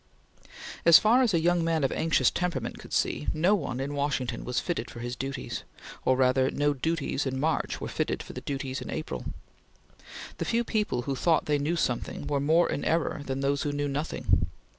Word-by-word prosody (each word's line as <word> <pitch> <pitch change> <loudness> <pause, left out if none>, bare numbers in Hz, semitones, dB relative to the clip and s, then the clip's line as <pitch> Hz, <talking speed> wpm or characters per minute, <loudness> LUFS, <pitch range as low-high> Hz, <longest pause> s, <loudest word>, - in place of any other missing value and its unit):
As 170 -1 +9
far 235 +4 +4
as 245 -4 +3
a 170 - +3
young 175 +1 +2
man 165 -2 +1
of 135 - +2
anxious 165 0 +2
temperament 180 -1 -2
could - - -12
see, 75 - 0
no 175 +6 +3
one 140 -10 -1
in 140 +2 -3
Washington 140 -3 -1
was 125 0 -1
fitted 165 -9 -3
for 120 - -9
his 120 +1 -4
duties; 135 0 -4 0.4
or 130 - +4
rather, 130 0 +3
no 145 0 +1
duties 145 -1 -1
in 130 0 -2
March 160 +3 0
were - - -4
fitted - - -2
for - - -10
the - - -6
duties 135 -1 -4
in - - -7
April. 155 - -4 1.1
The - - -1
few 235 +1 +1
people 210 - -1
who 135 +1 -2
thought 165 +5 +2
they 145 -1 +1
knew 150 +4 0
something 125 -8 -2
were 145 -1 0
more 160 +5 +3
in - - -2
error 160 -2 0
than 135 -1 -3
those 140 +1 +1
who 145 - -1
knew 145 0 -1
nothing. 145 +3 0
145 Hz, 205 wpm, -28 LUFS, 135-165 Hz, 1.1 s, As